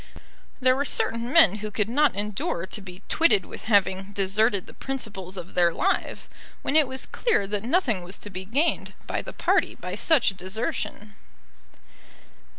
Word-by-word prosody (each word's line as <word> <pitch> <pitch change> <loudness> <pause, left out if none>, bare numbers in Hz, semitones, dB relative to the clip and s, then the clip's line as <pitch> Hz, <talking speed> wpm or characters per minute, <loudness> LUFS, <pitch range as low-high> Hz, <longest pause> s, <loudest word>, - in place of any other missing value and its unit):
There 255 -1 +4
were 280 - 0
certain 235 -3 0
men 245 - +6
who 215 0 -5
could 210 0 -1
not 280 +2 +2
endure 200 -4 -2
to 205 - -6
be 180 -1 -11
twitted 315 - +4
with - - -10
having 200 -2 +2
deserted 200 +1 +1
the - - -13
principles 200 -8 -5
of 180 0 -7
their 175 -1 +4
lives, 385 - -1 0.4
when 280 - -1
it 310 -3 +6
was 260 0 -2
clear 470 - 0
that 205 0 -2
nothing 250 - +1
was 180 +3 -8
to 205 - -10
be 185 0 -6
gained 275 - 0
by - - -2
the - - -8
party - - +1
by - - -7
such 255 -12 +2
desertion. 210 +2 -4
210 Hz, 165 wpm, -25 LUFS, 190-260 Hz, 0.4 s, men